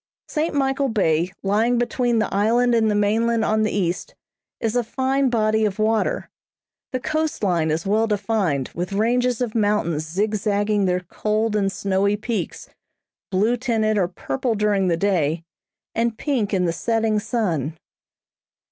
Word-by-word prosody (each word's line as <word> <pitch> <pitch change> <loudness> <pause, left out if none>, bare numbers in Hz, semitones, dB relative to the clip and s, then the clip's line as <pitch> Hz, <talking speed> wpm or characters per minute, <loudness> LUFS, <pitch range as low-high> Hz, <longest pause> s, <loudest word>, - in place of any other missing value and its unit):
St. 310 0 -1
Michael 270 0 +1
Bay, 175 -5 +1
lying 220 +5 +2
between 240 0 +1
the 215 - 0
island 235 +5 +3
and 225 -2 +3
the 210 - +1
mainland 225 +2 +2
on 215 0 +2
the 215 - +2
east, 180 -3 -2 0.4
is 225 +1 -1
a 245 - +2
fine 265 +3 0
body 220 -2 +2
of 205 -3 0
water. 220 0 0 0.6
The 255 - -1
coast 310 -1 -2
line 170 -5 +1
is 160 +3 -1
well 215 +3 +2
defined 195 - 0
with 175 +3 -4
ranges 245 +3 +1
of 235 -3 -1
mountains 205 -8 0
zigzagging 205 +2 0
their 180 0 +1
cold 215 +4 -1
and 195 -2 +1
snowy 200 +1 0
peaks, 220 +1 -4 0.6
blue 210 +5 +2
tinted 225 -3 0
or 190 -4 +2
purple 180 - -2
during 205 -2 +1
the 170 -2 +1
day, 170 -4 0 0.5
and 230 -1 0
pink 245 -9 -1
in 185 -2 +1
the 165 - 0
setting 225 +2 0
sun. 175 - -2
215 Hz, 155 wpm, -22 LUFS, 195-230 Hz, 0.6 s, island